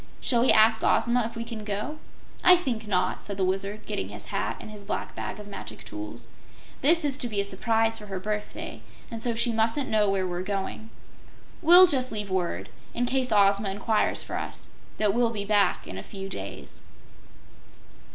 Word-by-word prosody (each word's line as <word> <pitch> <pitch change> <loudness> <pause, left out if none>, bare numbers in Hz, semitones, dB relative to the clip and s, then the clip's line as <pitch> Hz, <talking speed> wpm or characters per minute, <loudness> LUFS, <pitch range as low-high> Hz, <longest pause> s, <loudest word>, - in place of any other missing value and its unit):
Shall 240 -3 +2
we 255 - +5
ask 220 +1 +5
Ozma 235 -1 +3
if 230 - -11
we 230 - -3
can 230 -2 -7
go?" 210 +9 -4 0.4
"I 360 - +9
think 240 -11 -3
not," 185 -2 0
said 200 -2 -6
the 190 - +1
Wizard, 195 +3 -2
getting 95 - -3
his 105 0 -8
hat 105 +4 -1
and - - -9
his 210 -1 -8
black 200 - -4
bag - - -5
of 210 - -8
magic 205 - -8
tools. 110 +3 -7 0.5
"This 325 +3 +4
is 280 -1 0
to 245 - 0
be 210 -3 -2
a - - +3
surprise 225 +3 +1
for 210 - -10
her 195 -2 -4
birthday, 210 +2 -5 0.3
and 225 -1 -5
so 235 -1 -1
she 235 +1 +2
mustn't 225 +5 0
know 210 -2 +3
where 195 -1 +1
we're 175 -1 -3
going. 200 +3 -4 0.7
We'll 350 +3 +9
just 260 -7 +1
leave 210 -3 -3
word, 180 -2 -2 0.3
in 245 - +1
case 255 0 0
Ozma 200 -1 +4
inquires 210 +3 0
for - - -4
us, - - -8 0.3
that 210 -2 +2
we'll 240 +1 +3
be 210 -3 -4
back 205 -1 +2
in 95 - -7
a - - -7
few 195 -1 -7
days." 100 - -8
210 Hz, 195 wpm, -27 LUFS, 195-235 Hz, 0.7 s, I